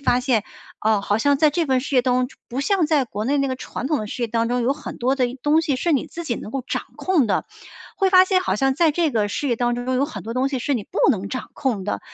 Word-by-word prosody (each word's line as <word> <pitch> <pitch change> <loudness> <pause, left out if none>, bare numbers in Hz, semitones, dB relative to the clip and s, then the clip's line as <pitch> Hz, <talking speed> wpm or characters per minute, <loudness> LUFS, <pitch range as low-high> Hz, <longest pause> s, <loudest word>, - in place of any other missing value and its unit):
发 250 -3 +2
现， 245 -4 +1 0.4
哦， 215 -1 +2
好 205 +1 0
像 285 +4 +3
在 305 +1 +4
这 325 +2 0
份 260 -2 +2
事 280 +2 -5
业 250 - +5
当 250 0 +1
中， 250 0 +2
就 - - -19
不 255 +3 -3
像 360 +3 +2
在 295 -4 +2
国 210 -2 -5
内 280 +5 +1
那 275 - +1
个 260 - -1
传 255 - -5
统 300 -1 +1
的 215 - -4
事 245 - -5
业 235 - +1
当 230 +1 0
中， 245 0 0
有 255 - +2
很 295 +1 -8
多 255 +3 +1
的 255 -2 +1
一 245 - -6
东 300 +2 +4
西 290 -5 -1
是 335 +5 0
你 275 - +1
自 340 - -7
己 240 -7 -1
能 215 - -7
够 265 0 -4
掌 - - -2
控 340 -10 +2
的。 - - +1 0.5
会 385 -2 +2
发 370 -1 +7
现 375 -1 +2
好 - - -1
像 270 +3 +1
在 330 -2 +4
这 330 -1 +1
个 215 -5 +1
事 280 +6 -2
业 235 - +1
当 240 0 +1
中， 245 +2 -2
有 275 - +2
很 305 - -7
多 230 - -5
东 260 +2 +1
西 270 - -2
是 285 - -1
你 230 -7 -1
不 - - -6
能 200 -5 -2
掌 255 - -5
控 240 -9 -2
的， 205 - -2
260 Hz, 330 characters per minute, -22 LUFS, 240-295 Hz, 0.5 s, 发